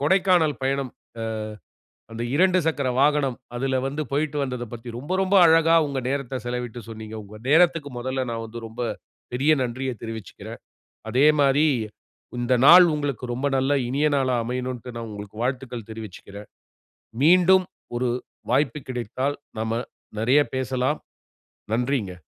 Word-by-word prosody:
கொடைக்கானல் 175 -1 +3
பயணம், 135 -1 0 1.2
அ - - -18
அந்த 115 +1 -4
2 185 +3 +4
சக்கர 145 -4 0
வாகனம், 145 -3 +2 0.2
அதில 130 +1 0
வந்து 145 +3 -3
போய்ட்டு 150 +1 -1
வந்ததைப் 125 -3 -5
பத்தி, 120 +1 -8
ரொம்ப 145 +9 -4
ரொம்ப 190 +1 +2
அழகா 165 0 +5
உங்க 140 -2 -2
நேரத்த 135 -2 -2
செலவிட்டு 120 -1 -4
சொன்னீங்க. 110 -1 -8
உங்க 105 +2 -12
நேரத்துக்கு 165 -2 +4
மொதல்ல 130 +1 -2
நான் 115 0 -4
வந்து, 115 +1 -8
ரொம்ப 115 +2 -7 0.5
பெரிய 135 +5 +2
நன்றிய 130 +2 -3
தெரிவிச்சிக்குறேன். 110 -5 -8 0.5
அதே 135 +4 +5
மாரி 145 +3 +4 0.7
இந்த 120 +1 +1
நாள் 175 +4 +10
உங்களுக்கு 140 -4 -3
ரொம்ப 130 +4 -1
நல்ல 135 +2 +1 0.2
இனிய 145 +4 +2
நாளா 130 -2 +1
அமையனுன்ட்டு, 125 0 -4
நான் 115 -1 -5
உங்களுக்கு 105 0 -9
வாழ்த்துக்கள் 125 -3 -3
தெரிவிச்சுக்கிறேன். 105 -1 -9 0.7
மீண்டும் 185 +3 +6 0.3
ஒரு 125 0 0 0.4
வாய்ப்பு 140 +2 +1
கிடைத்தால், 130 +3 -2 0.2
நம்ம 115 +1 -1 0.4
நிறைய 125 +6 +4 0.2
பேசலாம். 130 +2 -1 0.7
நன்றிங்க. 120 -6 -1
130 Hz, 135 wpm, -24 LUFS, 120-145 Hz, 1.2 s, நாள்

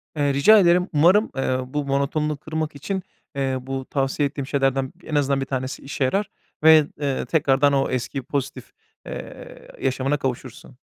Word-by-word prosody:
Eee, 145 -2 +1
rica 210 +11 +6
ederim. 180 0 +4
Umarım, 180 +9 +4
eee, 130 -1 0
bu 145 +2 -3
monotonunu 140 +2 -1
kırmak 155 0 -4
için, 190 +7 -4 0.3
eee, 135 -1 -1
bu 135 0 -5
tavsiye 135 +1 0
ettiğim 140 -1 -6
şeylerden 135 -1 0
en 155 - -5
azından 140 -1 +1
1 135 - -2
tanesi 130 0 -4
işe 135 0 -3
yarar 195 +10 0 0.3
ve, 155 -2 +7
eee, 140 -2 -1
tekrardan 140 -2 +2
o 135 0 +1
eski 130 +2 -3
pozitif, 140 0 -4 0.3
eee, - - -9
yaşamına 135 +2 0
kavuşursun. 130 -1 -6
140 Hz, 160 wpm, -23 LUFS, 135-150 Hz, 0.3 s, ve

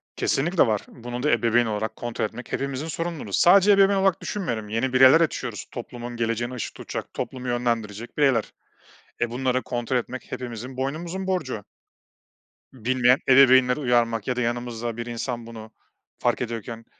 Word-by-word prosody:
Kesinlikle 165 +1 +2
var. 105 -2 0
Bunu 120 +1 -7
da 150 - +3
ebeveyn 120 +1 +3
olarak 110 0 -3
kontrol 120 -2 -3
etmek 120 +3 -8
hepimizin 140 +3 -3
sorumluluğu. 165 - -4
Sadece 195 +3 +6
ebeveyn 195 0 +5
olarak 190 -2 +2
düşünmüyorum, 120 - -3
yeni 125 +4 -1
bireyler 130 +5 +7
açıyoruz, 125 -8 -2
toplumun 120 0 -7
geleceğine 115 +1 -2
ışık 120 - -5
tutacak, - - -6
toplumu 130 -1 -5
yönlendirecek 115 -2 -2
bireyler. 135 -7 +2 0.7
E, 120 - 0
bunları 130 +1 0
kontrol 120 +1 -2
etmek 125 +1 -5
hepimizin 125 +1 -6
boynumuzun 165 +8 -3
borcu. 155 - -2 1.1
Bilmeyen 125 +1 +3
ebeveynleri 130 0 +6
uyarmak 120 -4 +1
ya 125 - 0
da 125 - -1
yanımızda 120 -1 -3
bir 120 - -4
insan 120 0 -4
bunu 110 -1 -10 0.5
fark 120 +1 +1
ediyorken 115 -1 -5
125 Hz, 150 wpm, -24 LUFS, 115-135 Hz, 1.1 s, bireyler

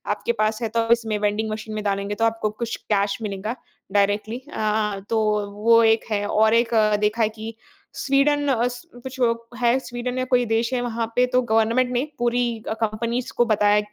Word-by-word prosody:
आपके 475 - -2
पास 215 +1 0
है 225 - -1
तो 230 0 +1
इसमें 225 -2 +2
वेंडिंग 210 +1 -1
मशीन 215 0 -5
में 215 - -3
डालेंगे 200 0 -1
तो 225 - +1
आपको 225 -1 0
कुछ 230 - -3 0.2
कैश 200 0 +1
मिलेगा 210 +3 -4 0.4
डायरेक्टली 205 +3 +1 0.2
अ, 210 -2 0
तो 210 -2 0
वो 230 +2 +5
एक 225 0 +3
है 205 -1 0
और 220 +1 +3
एक 235 0 +3 0.3
देखा 210 +2 +1
है 215 - +2
कि 220 +1 -8 0.4
स्वीडन 285 +1 +2
अ, 245 -3 +2
स 245 +3 -7 0.2
कुछ 260 0 -8 0.4
है 240 +2 +4
स्वीडन 250 0 -5
या 255 - 0
कोई 250 -1 +2
देश 230 +3 0
है 250 - +1
वहाँ 230 -1 -2
पे 250 - +4
तो 255 - +4
गवर्नमेंट 230 +2 +2
ने 245 - +1 0.2
पूरी 240 -2 0
अ, - - 0
कंपनीज़ 235 +3 -2
को 240 - +4
बताया 210 -2 +3
225 Hz, 195 wpm, -23 LUFS, 215-240 Hz, 0.4 s, वो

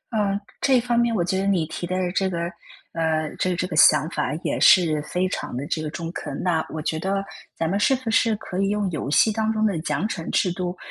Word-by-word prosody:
嗯， 200 -2 +1 0.2
这 260 -3 +4
方 240 0 0
面 235 -1 +2
我 175 - +1
觉 190 +1 0
得 195 - -1
你 185 -5 +2
提 170 +2 -5
的 185 -1 -1
这 190 0 0
个， 170 -2 -3 0.5
呃， 160 -2 -1
这 185 -1 +1
这 185 - -1
个 - - -5
想 150 0 +6
法 150 -3 -1
也 - - -1
是 160 -5 +5
非 180 +5 -1
常 155 - -4
地 135 - -4
这 155 0 -2
个 155 - -3
中 165 +2 -5
肯， 145 -5 -6
那 165 -3 +1
我 160 - -5
觉 160 0 -2
得 195 +2 -1 0.3
咱 165 - 0
们 195 +4 0
是 265 - +3
不 250 -3 -4
是 225 -1 +3
可 205 -3 -6
以 195 - +1
用 205 -1 0
游 150 -4 -3
戏 215 +9 +4
当 220 +1 0
中 220 0 +1
的 195 -7 0
奖 155 +4 -1
惩 165 -6 -5
制 180 - +1
度， 180 0 -4
180 Hz, 265 characters per minute, -23 LUFS, 160-205 Hz, 0.5 s, 想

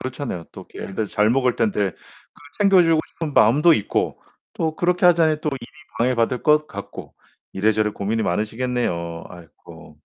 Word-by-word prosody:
그렇잖아요. 130 - -5
또 - - -11
애들 105 +2 -4
잘 105 +2 +1
먹을 125 -1 +2
땐데 105 -3 0
그 - - -28 0.6
챙겨주고 175 -5 +5
싶은 155 -4 -6
마음도 150 +9 +5
있고 100 - -2 0.3
또 160 -1 -2
그렇게 180 +1 +2
하자니 165 -3 +3
또 155 - -2
일이 130 -4 -6 0.3
방해받을 120 0 +1
것 150 0 +4
같고 - - -9 0.4
이래저래 105 +2 +1
고민이 105 +2 -2
많으시겠네요. 105 -5 -2
아이코. 80 -2 -15
120 Hz, 345 characters per minute, -22 LUFS, 105-150 Hz, 0.6 s, 챙겨주고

